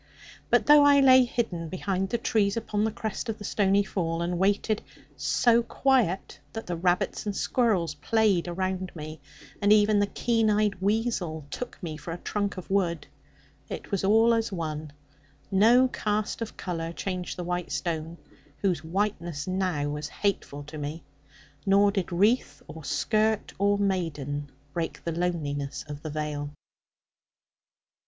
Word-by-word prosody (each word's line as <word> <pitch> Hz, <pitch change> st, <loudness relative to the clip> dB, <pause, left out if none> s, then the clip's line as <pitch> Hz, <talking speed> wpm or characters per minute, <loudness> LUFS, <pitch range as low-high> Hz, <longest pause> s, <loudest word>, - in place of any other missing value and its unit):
But -, -, +4 dB
though 295 Hz, 0 st, +8 dB
I 285 Hz, 0 st, +6 dB
lay 260 Hz, -2 st, +7 dB
hidden 180 Hz, -9 st, -2 dB
behind 190 Hz, +1 st, -2 dB
the 235 Hz, -, 0 dB
trees 215 Hz, -2 st, +1 dB
upon 210 Hz, -2 st, -1 dB
the 220 Hz, -, +1 dB
crest 220 Hz, +2 st, -4 dB
of 220 Hz, -, -2 dB
the 205 Hz, -, -9 dB
stony 200 Hz, 0 st, +2 dB
fall, 170 Hz, -4 st, -2 dB
and 175 Hz, 0 st, -2 dB
waited 205 Hz, +2 st, +1 dB, 0.3 s
so 235 Hz, -2 st, +3 dB
quiet 235 Hz, -6 st, +1 dB
that 225 Hz, -, -5 dB
the 175 Hz, -, -3 dB
rabbits 180 Hz, +4 st, 0 dB
and 205 Hz, -, -2 dB
squirrels 195 Hz, -, +1 dB
played 190 Hz, +4 st, +1 dB
around 185 Hz, +1 st, -2 dB
me, 155 Hz, -1 st, -8 dB, 0.4 s
and 205 Hz, 0 st, +4 dB
even 210 Hz, 0 st, +5 dB
the 205 Hz, -, +2 dB
keen 225 Hz, 0 st, +1 dB
eyed 210 Hz, -2 st, +1 dB
weasel 195 Hz, -7 st, -1 dB
took 250 Hz, -, -5 dB
me 155 Hz, -3 st, -4 dB
for 165 Hz, -, -7 dB
a 165 Hz, -, -4 dB
trunk 200 Hz, +2 st, -2 dB
of 185 Hz, -, -7 dB
wood 170 Hz, -5 st, +1 dB, 0.6 s
it -, -, -7 dB
was 200 Hz, -2 st, 0 dB
all 225 Hz, +4 st, +5 dB
as 225 Hz, -2 st, 0 dB
one; 155 Hz, -4 st, -4 dB, 0.6 s
no 230 Hz, +6 st, +6 dB
cast 215 Hz, -2 st, -2 dB
of 225 Hz, -, -5 dB
colour 165 Hz, -2 st, -3 dB
changed 180 Hz, 0 st, -4 dB
the 180 Hz, -, -3 dB
white 175 Hz, 0 st, -3 dB
stone, 165 Hz, -1 st, -3 dB, 0.4 s
whose 180 Hz, -6 st, 0 dB
whiteness 170 Hz, -4 st, -2 dB
now 185 Hz, -6 st, -1 dB
was 150 Hz, 0 st, -3 dB
hateful 160 Hz, -8 st, -2 dB
to 150 Hz, +1 st, -8 dB
me; 150 Hz, +3 st, -5 dB, 0.6 s
nor 200 Hz, +1 st, +4 dB
did 195 Hz, -3 st, -2 dB
wreath 210 Hz, +8 st, +1 dB
or 160 Hz, 0 st, -9 dB
skirt 215 Hz, +9 st, 0 dB
of 200 Hz, 0 st, +3 dB
maiden 145 Hz, -7 st, -2 dB, 0.2 s
break 165 Hz, -1 st, -3 dB
the 170 Hz, -, -2 dB
loneliness 155 Hz, -5 st, -2 dB
of 145 Hz, -1 st, -7 dB
the 155 Hz, -, -5 dB
vale. 150 Hz, -1 st, -3 dB
190 Hz, 155 wpm, -27 LUFS, 165-215 Hz, 0.6 s, though